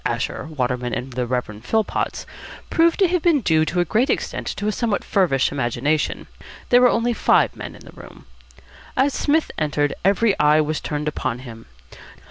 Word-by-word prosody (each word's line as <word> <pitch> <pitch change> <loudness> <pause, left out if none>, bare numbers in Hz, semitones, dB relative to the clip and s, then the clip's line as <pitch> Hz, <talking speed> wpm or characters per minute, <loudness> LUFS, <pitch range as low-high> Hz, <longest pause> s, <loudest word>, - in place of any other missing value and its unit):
Asher, - - -2
Waterman, 125 -5 -2
and 130 +1 -5
the 125 0 -2
Rev. 115 -4 -3
Philpotts 220 - -1 0.5
proved 335 0 +3
to 390 - +4
have 360 -1 +1
been 320 -5 +3
due 160 -6 +2
to 175 +3 -2
a - - 0
great 230 - +1
extent - - -2
to 205 - -3
a - - +2
somewhat 225 -1 -1
feverish 160 -9 +1
imagination. 140 +3 -1 0.4
There 245 0 +6
were 250 - +6
only 235 +1 +1
five - - +2
men - - -8
in - - -15
the - - -12
room. - - -14 0.7
As 275 +1 +3
Psmith 305 +2 +1
entered, 145 -1 0
every 200 +2 +3
eye 150 +1 +5
was 155 0 0
turned 150 0 -3
upon 130 -4 -3
him. 115 -2 -11
155 Hz, 180 wpm, -21 LUFS, -, 0.7 s, There